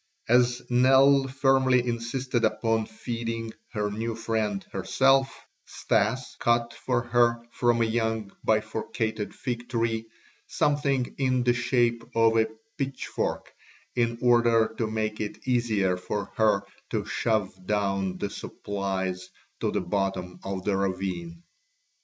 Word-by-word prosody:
As 125 +1 +3
Nell 135 +2 +5
firmly 130 -2 +3
insisted 120 +1 -1
upon 110 0 +1
feeding 115 0 -4 0.2
her 105 -2 -1
new 115 +2 -3
friend 110 -3 -1
herself, 135 +7 +2 0.2
Stas 110 +4 0
cut 120 0 +2
for 125 -2 -1
her 120 -1 +2
from 120 -1 +2
a - - +3
young 110 -2 -1
bifurcated 110 0 -1
fig 120 -1 -4
tree 115 -2 -1 0.4
something 140 -3 +1
in 130 -2 +2
the 120 0 +3
shape 120 -1 +1
of 115 0 +4
a 110 0 +4 0.3
pitchfork 135 -1 -3 0.4
in 115 -1 +1
order 120 -2 +4
to 115 - +1
make 110 0 -2
it 105 +4 -6
easier 110 -7 +1
for 100 +3 -4
her 105 -3 +3 0.3
to - - -2
shove 110 -4 0
down 100 -3 0
the 100 +2 -3
supplies 95 -3 -4 0.3
to - - 0
the - - -1
bottom 90 -1 -2
of 95 -1 -4
the 100 - +1
ravine. 100 - -3
115 Hz, 125 wpm, -27 LUFS, 105-125 Hz, 0.4 s, Nell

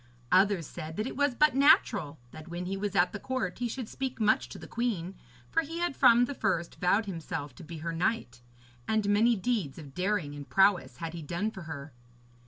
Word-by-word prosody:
Others 190 -2 +4
said 160 +1 -7
that 215 - -1
it - - -5
was 285 -2 +1
but 300 +2 +4
natural 205 - +4
that 155 +1 -11
when 175 +1 -5
he 190 +2 -2
was 200 0 -3
at 180 -1 +3
the 205 - -4
court 255 -8 -3
he 245 - 0
should 240 0 -5
speak 265 +1 -4
much 215 -1 +2
to - - -8
the - - -10
queen, 205 -7 -2 0.4
for - - +3
he 325 +2 -6
had 345 -4 -1
from 240 +1 +6
the 285 - -5
first 170 -9 -1
vowed 200 +5 +3
himself 160 -6 -5
to 170 - -12
be 165 +1 -8
her 165 - -2
knight, 165 - -1 0.5
and 220 -2 +1
many 220 +4 +4
deeds 195 - -1
of 145 -4 -10
daring 180 -3 -1
and 145 -1 -9
prowess 195 -1 +3
had 165 -1 -5
he 170 - -6
done 175 +8 -2
for 190 - -9
her. 145 -2 -7
195 Hz, 215 wpm, -29 LUFS, 165-235 Hz, 0.5 s, from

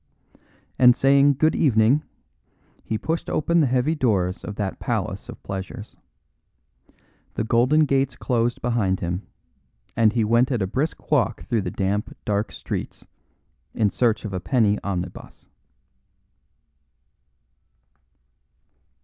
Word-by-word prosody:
And 125 -1 +7
saying 140 +1 +4
"Good 155 +4 +2
evening," 120 +1 +3 0.8
he 110 - -2
pushed 165 +8 -3
open 170 +3 +1
the 150 - +3
heavy 130 +5 +1
doors 100 - 0
of 105 - -6
that 100 -2 -4
palace - - -3
of - - -10
pleasures. 100 +3 -7 1.4
The - - -1
golden 120 +7 +3
gates 135 -2 0
closed 120 -1 -1
behind 110 -6 0
him, 90 +2 -3 0.7
and 110 -2 +4
he 115 -2 +1
went 115 +5 +2
at 125 - 0
a - - +1
brisk 135 - -3
walk 125 -6 +1
through 115 -4 -1
the 95 - -3
damp, 100 +3 -2
dark 105 +1 -1
streets - - -6 0.7
in 105 -3 +2
search 115 -3 0
of 100 - -5
a 95 - -2
penny 105 +1 +1
omnibus. 90 -2 -6
115 Hz, 125 wpm, -23 LUFS, 100-135 Hz, 1.4 s, And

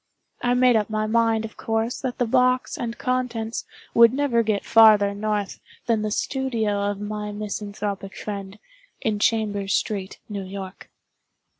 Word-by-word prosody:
I 245 0 +2
made 250 -1 +5
up 215 -1 +1
my 215 0 -1
mind, 225 0 +2
of 220 - -10
course, 225 +2 -2
that 255 -2 -3
the 245 - +1
box 255 +2 +2
and 235 -1 -4
contents 245 -3 -2 0.3
would 235 -1 +7
never 265 -3 +1
get 215 -3 -1
farther 215 -3 +6
north 205 -1 -2 0.3
than 230 -3 +1
the 215 - -1
studio 220 -4 -1
of 205 -1 -4
my 210 0 -4
misanthropic 205 -1 -5
friend, 200 -1 -6 0.4
in 215 -2 -1
Chambers 205 -3 +1
Street, 195 -2 -2
New 200 -2 -5
York. 190 0 -8
215 Hz, 150 wpm, -24 LUFS, 205-235 Hz, 0.4 s, would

